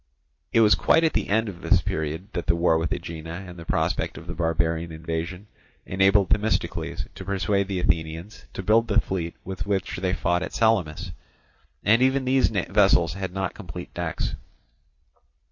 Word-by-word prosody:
It 115 Hz, -, +4 dB
was 105 Hz, -1 st, +6 dB
quite 165 Hz, -, +3 dB
at 160 Hz, -, +2 dB
the -, -, 0 dB
end 110 Hz, +2 st, +2 dB
of 90 Hz, -3 st, -7 dB
this 95 Hz, -3 st, +4 dB
period 80 Hz, +3 st, -3 dB
that 85 Hz, -, -3 dB
the 85 Hz, -, +3 dB
war 85 Hz, -1 st, +3 dB
with 80 Hz, -, -2 dB
Aegina 80 Hz, +2 st, -5 dB
and 90 Hz, -1 st, -10 dB
the 85 Hz, -, -9 dB
prospect -, -, 0 dB
of -, -, -10 dB
the -, -, -5 dB
barbarian 85 Hz, 0 st, 0 dB
invasion 80 Hz, +4 st, -4 dB, 0.4 s
enabled 95 Hz, +1 st, +3 dB
Themistocles 85 Hz, -4 st, 0 dB
to 95 Hz, -, -8 dB
persuade 100 Hz, +1 st, 0 dB
the 95 Hz, -2 st, -2 dB
Athenians 85 Hz, +3 st, -2 dB
to 95 Hz, -, -5 dB
build 110 Hz, +4 st, +4 dB
the 105 Hz, 0 st, +3 dB
fleet 85 Hz, -5 st, -3 dB
with 95 Hz, +1 st, -5 dB
which 100 Hz, -2 st, -1 dB
they 90 Hz, 0 st, -1 dB
fought 85 Hz, -1 st, +1 dB
at 90 Hz, -, -5 dB
Salamis; 95 Hz, -5 st, +1 dB, 0.7 s
and 115 Hz, +4 st, +4 dB
even 130 Hz, +1 st, +3 dB
these 130 Hz, 0 st, +3 dB
vessels 95 Hz, -6 st, +3 dB
had 95 Hz, -1 st, -4 dB
not 95 Hz, -1 st, -2 dB
complete -, -, -9 dB
decks. -, -, -3 dB
95 Hz, 175 wpm, -25 LUFS, 85-100 Hz, 0.7 s, was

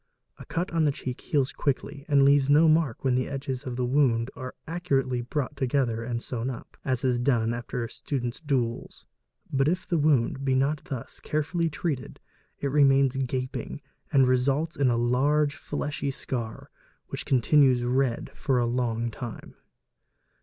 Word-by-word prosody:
A -, -, -10 dB
cut 175 Hz, +2 st, -2 dB
on 165 Hz, -1 st, +2 dB
the 150 Hz, -, +3 dB
cheek 130 Hz, -2 st, -6 dB
heals 140 Hz, -3 st, 0 dB
quickly 140 Hz, +1 st, -2 dB
and 140 Hz, -2 st, +5 dB
leaves 140 Hz, -1 st, +4 dB
no 155 Hz, +3 st, +6 dB
mark 155 Hz, -6 st, +2 dB
when 130 Hz, -2 st, +2 dB
the 130 Hz, 0 st, +1 dB
edges 135 Hz, -1 st, -4 dB
of 125 Hz, -, -3 dB
the 125 Hz, 0 st, 0 dB
wound 125 Hz, -3 st, +2 dB
are 130 Hz, -1 st, -7 dB
accurately 135 Hz, -7 st, 0 dB
brought 135 Hz, +3 st, -3 dB
together 125 Hz, -4 st, 0 dB
and 120 Hz, 0 st, -3 dB
sewn 120 Hz, 0 st, -3 dB
up, 125 Hz, -, -8 dB
as 130 Hz, -2 st, -1 dB
is 125 Hz, -2 st, +2 dB
done 120 Hz, -3 st, +2 dB
after 120 Hz, 0 st, -4 dB
students' 120 Hz, -1 st, -4 dB
duels. 130 Hz, -6 st, -2 dB, 0.5 s
But 135 Hz, +1 st, +2 dB
if 180 Hz, +3 st, 0 dB
the 175 Hz, -3 st, +1 dB
wound 140 Hz, -3 st, +2 dB
be 135 Hz, -1 st, +2 dB
not 140 Hz, +4 st, 0 dB
thus 135 Hz, -9 st, -6 dB
carefully 160 Hz, +2 st, -1 dB
treated, 150 Hz, -4 st, -4 dB, 0.4 s
it 140 Hz, -, -1 dB
remains 135 Hz, -2 st, +4 dB
gaping 130 Hz, +1 st, -3 dB, 0.3 s
and 135 Hz, -4 st, +5 dB
_ -, -, +1 dB
results 135 Hz, +6 st, +1 dB
in 135 Hz, -2 st, +2 dB
a 120 Hz, -, +2 dB
large 140 Hz, +5 st, +2 dB
fleshy 145 Hz, -1 st, -3 dB
scar, 120 Hz, -4 st, -4 dB, 0.4 s
which -, -, -4 dB
continues 130 Hz, 0 st, +4 dB
red 125 Hz, 0 st, 0 dB
for 135 Hz, -2 st, 0 dB
a 120 Hz, -, +2 dB
long 120 Hz, -1 st, -1 dB
time. 115 Hz, 0 st, -8 dB
135 Hz, 165 wpm, -27 LUFS, 125-145 Hz, 0.5 s, no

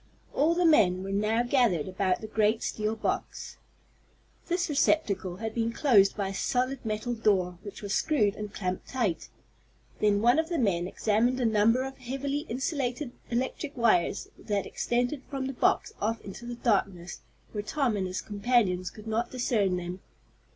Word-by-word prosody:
All 315 Hz, +4 st, +3 dB
the 355 Hz, 0 st, +2 dB
men 190 Hz, -, +4 dB
were 195 Hz, -, -5 dB
now 215 Hz, +4 st, +1 dB
gathered 240 Hz, -, +2 dB
about 185 Hz, -1 st, 0 dB
the 220 Hz, -, -6 dB
great 215 Hz, +1 st, +1 dB
steel 215 Hz, +1 st, -1 dB
box. 225 Hz, -, -3 dB, 0.9 s
This 350 Hz, 0 st, 0 dB
receptacle 215 Hz, -, +1 dB
had 220 Hz, +3 st, -4 dB
been 230 Hz, -1 st, 0 dB
closed 220 Hz, -7 st, +4 dB
by 200 Hz, -2 st, -1 dB
a -, -, -5 dB
solid 255 Hz, +5 st, -1 dB
metal 215 Hz, +2 st, -2 dB
door, 185 Hz, -6 st, +1 dB
which 205 Hz, 0 st, -9 dB
was 205 Hz, 0 st, -2 dB
screwed 215 Hz, -10 st, +2 dB
and 210 Hz, -1 st, -6 dB
clamped 185 Hz, -3 st, -4 dB
tight. 225 Hz, -10 st, -1 dB, 0.7 s
Then 205 Hz, 0 st, +2 dB
one 245 Hz, +5 st, +5 dB
of 320 Hz, +1 st, -1 dB
the 340 Hz, -, -1 dB
men 180 Hz, -, +1 dB
examined 225 Hz, +6 st, +1 dB
a 245 Hz, -, +1 dB
number 225 Hz, +3 st, +3 dB
of 270 Hz, 0 st, -7 dB
heavily 275 Hz, +4 st, -3 dB
insulated 255 Hz, +1 st, -2 dB, 0.2 s
electric 260 Hz, +4 st, -2 dB
wires 215 Hz, -5 st, +2 dB
that 205 Hz, -1 st, -2 dB
extended 245 Hz, +4 st, -1 dB
from 270 Hz, -1 st, -3 dB
the 270 Hz, -, -3 dB
box -, -, +1 dB
off 225 Hz, +2 st, 0 dB
into 205 Hz, +4 st, -9 dB
the 240 Hz, -, -4 dB
darkness 195 Hz, -7 st, -1 dB, 0.3 s
where 210 Hz, -, -3 dB
Tom 250 Hz, +1 st, 0 dB
and 190 Hz, -2 st, -1 dB
his 185 Hz, +1 st, -3 dB
companions 205 Hz, -4 st, +1 dB
could 215 Hz, -, -13 dB
not 225 Hz, +2 st, -1 dB
discern 215 Hz, -7 st, +1 dB
them. 180 Hz, +1 st, -5 dB
220 Hz, 170 wpm, -28 LUFS, 200-255 Hz, 0.9 s, one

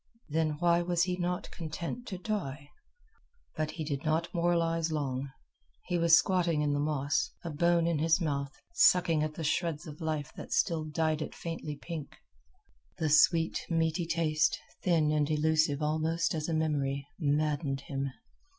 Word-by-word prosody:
Then 155 Hz, 0 st, +1 dB
why 170 Hz, +1 st, +3 dB
was 175 Hz, -1 st, +1 dB
he 180 Hz, 0 st, 0 dB
not 180 Hz, 0 st, -3 dB
content 170 Hz, +8 st, -5 dB
to 190 Hz, -, -4 dB
die? 150 Hz, -8 st, -4 dB, 0.8 s
But 155 Hz, 0 st, -1 dB
he 155 Hz, +1 st, -5 dB
did 145 Hz, -2 st, -3 dB
not 165 Hz, +2 st, 0 dB
moralize 165 Hz, -1 st, +1 dB
long. 140 Hz, -3 st, -2 dB, 0.6 s
He 175 Hz, -1 st, 0 dB
was 165 Hz, -1 st, +7 dB
squatting 170 Hz, -5 st, +2 dB
in 145 Hz, -1 st, +1 dB
the 145 Hz, -, 0 dB
moss, 150 Hz, -, 0 dB
a 170 Hz, -, -4 dB
bone 170 Hz, +2 st, +2 dB
in 170 Hz, -3 st, +1 dB
his 165 Hz, +3 st, +3 dB
mouth, 140 Hz, -5 st, -1 dB, 0.2 s
sucking 180 Hz, -, +4 dB
at 155 Hz, 0 st, -2 dB
the 165 Hz, -, -5 dB
shreds 160 Hz, +1 st, -1 dB
of 155 Hz, 0 st, -10 dB
life 150 Hz, -4 st, -2 dB
that -, -, -9 dB
still 160 Hz, -2 st, +1 dB
dyed 155 Hz, 0 st, 0 dB
it -, -, -5 dB
faintly 165 Hz, -3 st, -5 dB
pink. 155 Hz, -1 st, -7 dB, 0.8 s
The 160 Hz, -, 0 dB
sweet 165 Hz, +2 st, +4 dB
meaty 165 Hz, 0 st, 0 dB
taste, 155 Hz, -2 st, +1 dB, 0.2 s
thin 160 Hz, -4 st, +2 dB
and 150 Hz, -1 st, +1 dB
elusive 155 Hz, -1 st, +2 dB
almost 160 Hz, +2 st, 0 dB
as 155 Hz, 0 st, -2 dB
a -, -, 0 dB
memory, 140 Hz, -3 st, 0 dB
maddened 145 Hz, -2 st, 0 dB
him. 135 Hz, 0 st, -3 dB
160 Hz, 160 wpm, -30 LUFS, 150-170 Hz, 0.8 s, was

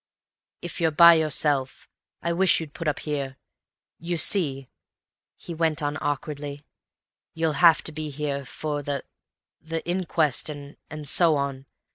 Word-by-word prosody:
"If 175 Hz, 0 st, -6 dB
you're 165 Hz, -, +3 dB
by 170 Hz, +2 st, +8 dB
yourself, 150 Hz, -4 st, +1 dB, 0.4 s
I 170 Hz, -, 0 dB
wish 185 Hz, +2 st, +3 dB
you'd 155 Hz, -3 st, -8 dB
put 165 Hz, -, -5 dB
up 150 Hz, -, -1 dB
here. 140 Hz, -3 st, -4 dB, 0.6 s
You 170 Hz, +1 st, -3 dB
see," 140 Hz, -7 st, +2 dB, 0.7 s
he 170 Hz, -, -9 dB
went 160 Hz, -1 st, 0 dB
on 145 Hz, +1 st, -1 dB
awkwardly, 145 Hz, 0 st, -4 dB, 0.7 s
"you'll 160 Hz, -1 st, 0 dB
have 170 Hz, -2 st, +6 dB
to -, -, -3 dB
be 155 Hz, 0 st, -5 dB
here—for 145 Hz, +1 st, -4 dB
the—the 150 Hz, +3 st, -8 dB
inquest 170 Hz, -6 st, 0 dB
and—and 145 Hz, +1 st, -9 dB
so 165 Hz, +1 st, +3 dB
on. 140 Hz, -1 st, -3 dB
150 Hz, 130 wpm, -25 LUFS, 145-165 Hz, 0.7 s, by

